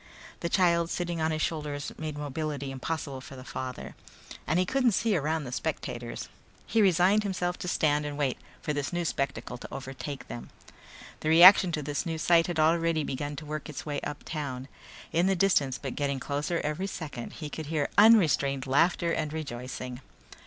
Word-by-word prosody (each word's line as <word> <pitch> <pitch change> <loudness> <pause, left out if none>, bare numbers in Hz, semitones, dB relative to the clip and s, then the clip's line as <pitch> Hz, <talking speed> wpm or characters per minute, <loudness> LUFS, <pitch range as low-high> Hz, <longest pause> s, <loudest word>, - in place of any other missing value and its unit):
The 170 - -2
child 170 -2 +3
sitting 175 -2 -2
on 160 - +2
his 155 -1 -1
shoulders 150 -3 -3
made 155 -2 -5
mobility 145 -1 -3
impossible 135 0 -4
for 135 - -10
the 130 - -9
father. 130 -1 -6 0.5
And 160 - +2
he 185 - +3
couldn't 255 +2 +2
see 220 +1 +2
around 160 0 0
the 125 - -6
spectators. 125 -5 -4 0.4
He 225 - +2
resigned 190 +2 +4
himself 180 -3 -2
to - - -5
stand 150 -3 +2
and 145 -1 -4
wait 140 -4 0 0.2
for 150 - -1
this 145 -1 -2
new 175 -1 -1
spectacle 140 -4 -3
to - - -9
overtake 135 0 -6
them. 120 - -7 0.7
The 155 - -1
reaction 180 +3 +9
to 150 - -1
this 145 0 -2
new 165 -3 -3
sight 165 +1 +4
had 175 -2 -3
already 165 0 +3
begun 145 +2 -3
to 150 - -8
work 155 0 -5
its 150 - -6
way 145 -2 -2
uptown. 140 -3 -5 0.4
In 170 +3 +3
the 195 - +3
distance, 160 -9 +2
but 135 -3 -5
getting 140 -2 -1
closer 150 +5 -2
every 150 +6 -2
second, 150 -10 -6
he 150 -3 -7
could 160 -2 -5
hear 150 -2 0
unrestrained 160 -11 +5
laughter 170 +5 +2
and 155 -2 -1
rejoicing. 125 -4 -5
155 Hz, 180 wpm, -28 LUFS, 140-170 Hz, 0.7 s, reaction